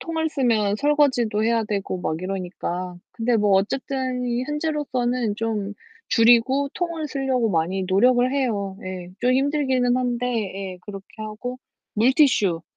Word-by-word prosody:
통을 320 -1 -2
쓰면 220 -8 +1
설거지도 255 -6 +2
해야 230 -1 +2
되고 200 -3 -3
막 160 - -2
이러니까. 180 -1 -4 0.2
근데 235 0 +1
뭐 205 -2 +2
어쨌든 255 +5 0 0.2
현재로서는 260 -7 -1
좀 215 -3 -2 0.3
줄이고 240 +4 +4
통을 335 -3 -3
쓰려고 260 -4 0
많이 180 +2 0
노력을 245 +6 +3
해요. 210 -8 -1
예, 185 -1 -6
좀 250 +1 +3
힘들기는 265 -2 +2
한데, 245 -1 -1 0.5
예, 180 - -15
그렇게 195 -1 -8
하고. 215 +4 -6 0.4
물티슈 225 - +3
240 Hz, 285 characters per minute, -23 LUFS, 200-265 Hz, 0.5 s, 줄이고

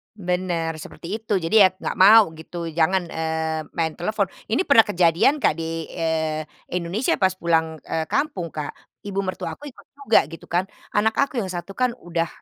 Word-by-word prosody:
Bener, 180 -4 -1
seperti 170 +2 -10
itu. 215 -2 -1
Jadi, 165 +4 -1
ya 190 - +9
nggak - - -4
mau 215 +3 +9
gitu 170 +2 -7
jangan, 175 +3 +2
eee, 160 0 -2 0.2
main 160 -2 0
telepon. 200 +3 0 0.2
Ini 230 - +2
pernah 280 -6 +7
kejadian 180 - +3
Kak, - - +3
di, 165 -1 -3
eee, 160 -2 -1 0.3
Indonesia 180 +7 0
pas 190 -1 +4
pulang, 160 -2 +1
eee, 160 -1 -2
kampung, 190 - -1
Kak. 150 -2 -5 0.3
Ibu 195 -1 -3
mertua 185 -1 -4
aku - - -14
ikut - - -18
juga 275 -6 +3
gitu 165 - -11
kan, 175 +2 +1 0.3
anak 220 +1 +2
aku 275 -2 -1
yang 195 - -2
satu 175 +1 -6
kan 250 -2 +1
udah 165 -1 0
175 Hz, 180 wpm, -23 LUFS, 165-205 Hz, 0.3 s, ya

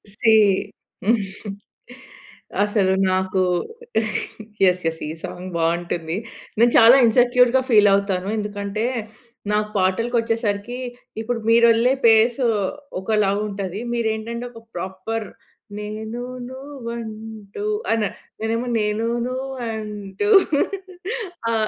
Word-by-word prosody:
See. 225 -1 +4 2.3
అసలు 205 -2 +2 0.2
నాకు 185 0 +1 1.2
yes! 180 -1 +4
Yes! 160 0 -3
ఈ - - -3
సాంగ్ 180 +1 -6
బావుంటుంది. 170 +1 -1 0.4
నేను 235 +1 +5
చాలా 230 +3 +9
ఇన్సెక్యూర్‌గా 245 +2 +4
ఫీలవుతాను. 200 -4 +4
ఎందుకంటే 205 +1 -3 0.7
నాకు 210 0 +1
పాటలకొచ్చేసరికి 225 +2 0 0.4
ఇప్పుడు 235 +1 -2
మీరె‌ళ్ళే 235 +2 +5
పేసు 230 +3 +4 0.6
ఒకలా 210 -1 +2 0.2
ఉంటది. 195 -1 -4
మీరేంటంటే 230 +1 -2
ఒక 230 - -12
ప్రాపర్ 190 +5 -4 0.5
నేను 220 +3 -5 0.3
నువ్వుంటూ 235 - -7 0.3
అన 225 -1 +2 0.4
నేనేమో 230 +2 -1
నేను 210 +1 0 0.2
నువంటు 225 - -4 1.2
ఆ! - - 0
220 Hz, 85 wpm, -22 LUFS, 200-235 Hz, 2.3 s, చాలా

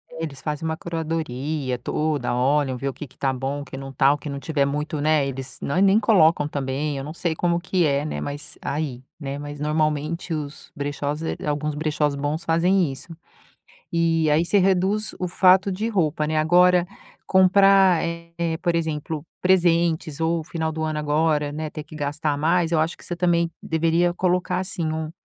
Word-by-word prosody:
É, 165 0 -7
eles 140 -4 -6
fazem 150 +1 -3
uma 160 0 -2
curadoria 155 -5 -3
toda, 150 0 -1
olham, 135 +1 +1
ver 140 +2 -2
o - - -6
que 150 - -8
que 130 - -24
está 135 - 0
bom, 135 +2 -3
o - - -8
que 135 - -9
não 135 0 -7
está, 135 +1 +3
o - - -3
que 145 - -7
não 140 0 -4
tiver 140 0 0
muito, 150 +2 -2
né, 155 -1 +3
eles 135 -1 -6
nã 140 - -1
nem 200 +2 +5
colocam 165 -9 +4
também, 140 +1 -2
eu 135 - -4
não 150 +3 -6
sei 170 -1 -2
como 170 +1 +1
que 180 0 +1
é, 140 0 +1
né, 155 - -4
mas 145 +1 -6
aí, 140 -4 -3 0.2
né, 140 -2 -4
mas 145 0 -7
normalmente, 155 +2 -1
os 150 -1 -6
brechós, 145 0 -3
eh, 160 - -2
alguns 150 0 -1
brechós 150 -1 0
bons 145 +3 -2
fazem 170 0 +2
isso. 135 +6 -10 0.8
E 165 -2 +2
aí 155 +3 +3
você 200 +4 +2
reduz 195 +3 +1
o 180 - -1
fato 185 +2 +4
de 210 +5 -2
roupa, 160 -8 0
né. 155 +1 -1
Agora 175 +3 +4 0.4
comprar, 190 -1 +5
eh, 170 0 -5 0.3
por 175 -2 +1
exemplo, 160 -2 -3 0.2
presentes, 170 -4 +2
ou 165 0 +1
final 160 0 -3
do 160 0 -4
ano 155 -1 -1
agora, 150 0 +1
né, 155 +1 -4
ter 155 - -6
que 155 - -14
gastar 150 0 -1
mais, 165 +2 +2
eu 165 - +3
acho 160 +2 -1
que - - -15
você 175 - -4
também 170 -1 +2
deveria 165 +2 +1
colocar, 180 0 0
assim, 180 -3 -3
um, 155 0 -3
155 Hz, 195 wpm, -23 LUFS, 145-170 Hz, 0.8 s, nem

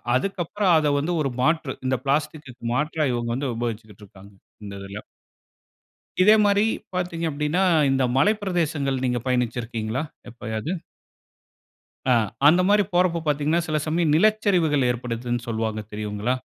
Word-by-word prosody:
அதுக்கப்பறம் 185 +4 +1
அத 150 -2 +2
வந்து 160 +5 -1
ஒரு 135 -3 -1
மாற்று 155 -2 +1
இந்த 130 0 +1
பிளாஸ்டிக்கு 145 -1 -1 0.2
மாற்றா 155 +3 0
இவுங்க 120 -1 -2
வந்து 135 0 -2
உபயோகிச்சுக்கிட்டு 110 -3 -5
இருக்காங்க. 100 +1 -16 0.3
இந்த 100 - -7
இதில. 100 +2 -7 1.2
இதேமாரி 205 0 +5 0.3
பார்த்தீங்க 175 -2 -2
அப்பிடின்னா, 150 +5 0 0.3
இந்த 135 0 +2
மலை 205 +11 +4
பிரதேசங்கள் 145 -8 -1
நீங்க 125 -1 0
பயணிச்சு 125 -2 0
இருக்கீங்களா 115 +1 -3 0.3
எப்பயாவது? 115 +4 -5 1.4
ஆ - - +6 0.3
அந்தமாரி 185 +6 +4
போறப்ப 175 -1 +2
பார்த்தீங்கன்னா, 150 +3 +1
சில 155 -1 0
சமயம் 160 -1 +1
நிலச்சரிவுகள் 180 - +3
ஏற்படுதுன்னு 120 0 -3
சொல்வாங்க 110 -1 -2
தெரியுங்களா? 105 +3 -2
140 Hz, 125 wpm, -24 LUFS, 120-170 Hz, 1.4 s, ஆ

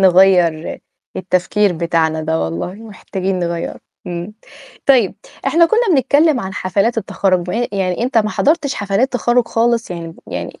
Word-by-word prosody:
نغيّر 180 -4 +4 0.4
التفكير 185 +2 +1
بتاعنا 160 -1 0
ده 160 +1 -1
والله، 85 - -3
محتاجين 195 -3 -4
نغيّره، 170 -1 -3 0.3
إمم. 175 +4 -5 0.5
طيب 250 -8 +4 0.3
إحنا 335 +1 +4
كنّا 450 +5 +2
بنتكلّم 285 +1 +3
عن 190 0 -6
حفلات 200 +5 0
التخرُّج 185 -4 0
بع 180 - -3 0.2
يعني 190 +1 -1
أنت 245 -1 +2
ما 215 -1 +1
حضرتش 290 +1 +1
حفلات 205 +6 0
تخرّج 240 0 +1
خالص، 230 -2 +1
يعني 165 -2 -6
يعني - - -6
195 Hz, 140 wpm, -17 LUFS, 175-235 Hz, 0.5 s, نغيّر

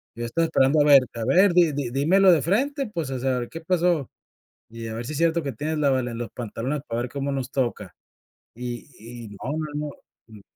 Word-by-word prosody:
Yo 120 +1 -4
estaba 165 +8 0
esperando 150 -2 +3
a 145 - +4
ver 140 -2 +8
a 115 -1 -3
ver 180 - +5
dí 170 -3 +5
dí 140 -3 -2
dímelo 175 +9 +4
de 165 -4 +4
frente 265 - 0
pues 165 -9 -4
o 130 - -3
sea 130 0 0
a - - -1
ver, 120 - -5
¿qué 165 - -7
pasó? 170 -4 +1 0.6
Y 115 0 -7
a 110 - -5
ver 115 +1 -5
si 150 - -5
es - - -4
cierto 170 +1 +2
que 140 - -3
tienes 155 +7 -3
la 145 -2 +3
valen 125 -3 -1
los 120 - -4
pantalones 125 +5 -4
para 115 +1 -2
ver 120 - -4
cómo 140 +1 -3
nos 135 -2 -3
toca. 130 -3 -2 0.6
Y 120 +1 -6 0.4
y 110 - -9
no 105 +6 -6
no 155 -1 -3
no. 150 0 -3 0.4
Mm. 110 -2 -14
140 Hz, 240 wpm, -24 LUFS, 120-165 Hz, 0.6 s, ver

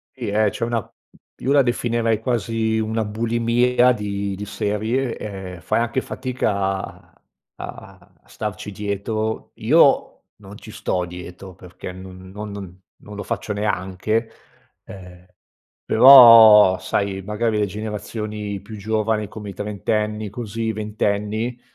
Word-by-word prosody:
Sì, - - -6
ehm, 105 +1 +2
c'è 115 - -3
una 120 -1 -1
mhmm, - - -20 0.5
io 135 - -2
la 140 - +6
definirei 115 -2 0
quasi 115 -1 -1
una 110 0 -1
bulimia 115 +3 +2
di 100 -2 -4
di 105 +2 -6
serie, 110 +5 -2
ehm, 95 -4 -8
fai - - 0
anche 120 +2 -1
fatica 125 -4 -3
a 95 0 -4 0.4
a - - -10 0.2
a - - -31
starci 105 - -6
dietro. 105 +2 -3
Io, - - +4 0.3
non 100 +1 -12
ci 110 - -12
sto 90 -3 -2
dietro, 90 +1 -10
perché 90 0 -10
n 95 0 -11
no 105 +2 -7
non 100 -3 -8 0.3
non 105 0 -10
lo 100 - -5
faccio 105 - -4
neanche 105 +2 -2 0.5
ehm, 90 -2 -13 0.6
però, 115 -6 +9
sai, 100 -1 -2
magari 105 +2 -1
le 105 - +2
generazioni 105 0 -5
più 105 +1 -10
giovani, 110 0 -1
come 105 -1 -9
i - - -7
trentenni 105 +1 -2
così 115 0 -5
i 110 - -1
ventenni 105 +2 -2
105 Hz, 140 wpm, -21 LUFS, 100-115 Hz, 0.6 s, però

